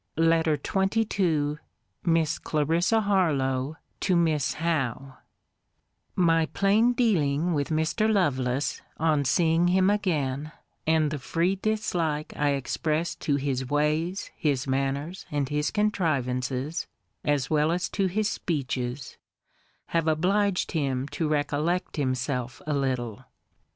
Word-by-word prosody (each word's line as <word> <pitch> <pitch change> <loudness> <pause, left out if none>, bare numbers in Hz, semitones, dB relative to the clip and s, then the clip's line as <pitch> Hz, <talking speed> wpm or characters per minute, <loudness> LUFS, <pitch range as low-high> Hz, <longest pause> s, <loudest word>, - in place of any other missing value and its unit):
LETTER 165 -1 +3
XXII 190 -7 +1 0.5
MISS 165 -2 +1
CLARISSA 165 +8 +1
HARLOWE, 150 -9 +1 0.2
TO 185 - +1
MISS 160 -4 +1
HOWE 135 -5 -1 1.0
My 165 -3 +3
plain 215 +7 +3
dealing 175 - +1
with 145 -2 -1
Mr. 160 +8 +1
Lovelace, 135 -9 0 0.2
on 155 -2 +2
seeing 165 +4 +3
him 185 +2 +4
again, 155 -7 -1 0.3
and 155 -2 +3
the 150 - -3
free 170 +7 0
dislike 175 -7 -1
I 145 -1 +1
expressed 155 +5 -1
to 145 - 0
his 135 -2 -2
ways, 155 +6 0
his 140 -4 0
manners, 140 +6 -2
and 145 -2 -1
his 150 0 0
contrivances, 140 - -1 0.4
as 145 -3 0
well 155 +1 +3
as 175 0 0
to 195 -2 0
his 205 +3 0
speeches, 130 - -3 0.7
have 165 -1 0
obliged 185 +5 +1
him 135 -4 -1
to 145 +3 -2
recollect 150 +4 -1
himself 130 -1 -2
a 150 - -1
little. 130 -6 -2
155 Hz, 115 wpm, -27 LUFS, 140-175 Hz, 1.0 s, him